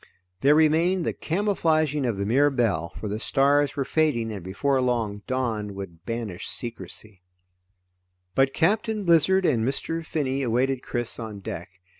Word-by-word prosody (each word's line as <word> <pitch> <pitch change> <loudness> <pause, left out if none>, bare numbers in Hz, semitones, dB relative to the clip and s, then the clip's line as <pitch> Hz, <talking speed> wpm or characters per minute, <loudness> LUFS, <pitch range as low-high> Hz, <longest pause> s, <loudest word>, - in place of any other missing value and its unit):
There 140 +7 +5
remained 165 +3 +3
the - - 0
camouflaging 155 -6 0
of 115 -4 -1
the 100 - -1
Mirabelle, 115 - +2
for 110 - -4
the 105 +1 -3
stars 140 +4 +2
were 140 -2 -1
fading 125 -8 +1
and 100 -4 -6
before 130 +9 0
long, 115 -5 -1
dawn 110 -6 -2
would 85 -4 -9
banish 115 -5 -4
secrecy. 110 -3 -5 1.1
But 135 0 +3
Captain 210 +7 +1
Blizzard 180 +2 +4
and 120 -9 +2
Mr. 165 +6 -2
Finney 140 -4 -2
awaited 130 +1 +1
Chris 120 -2 -4
on 110 -3 -6
deck. 90 -2 -6
130 Hz, 145 wpm, -25 LUFS, 110-155 Hz, 1.1 s, There